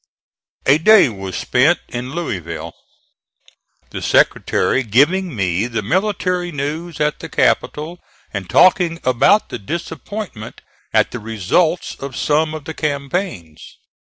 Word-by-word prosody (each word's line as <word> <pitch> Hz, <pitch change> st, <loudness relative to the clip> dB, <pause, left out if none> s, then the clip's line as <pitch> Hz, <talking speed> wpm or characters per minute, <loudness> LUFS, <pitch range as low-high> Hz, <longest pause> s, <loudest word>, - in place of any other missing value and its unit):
A 140 Hz, +3 st, +5 dB
day 215 Hz, -2 st, +6 dB
was 95 Hz, -3 st, -7 dB
spent 140 Hz, +8 st, +3 dB
in 125 Hz, +2 st, -6 dB
Louisville, 85 Hz, -, -4 dB, 1.2 s
the -, -, -5 dB
Secretary 135 Hz, -, +2 dB
giving 145 Hz, -, +2 dB
me 95 Hz, +1 st, 0 dB
the 115 Hz, -3 st, -3 dB
military 180 Hz, -, 0 dB
news 155 Hz, +3 st, -4 dB
at 150 Hz, 0 st, 0 dB
the -, -, -8 dB
capital 160 Hz, +4 st, 0 dB, 0.3 s
and 95 Hz, -3 st, -5 dB
talking 175 Hz, -2 st, +4 dB
about 130 Hz, -, +3 dB
the -, -, -5 dB
disappointment 165 Hz, -, -6 dB, 0.3 s
at -, -, +2 dB
the 125 Hz, -, -5 dB
results 115 Hz, -, 0 dB
of 135 Hz, -2 st, -6 dB
some 155 Hz, +1 st, +1 dB
of 155 Hz, -, -8 dB
the 160 Hz, -, -5 dB
campaigns. 140 Hz, -, -4 dB
145 Hz, 125 wpm, -18 LUFS, 115-175 Hz, 1.2 s, day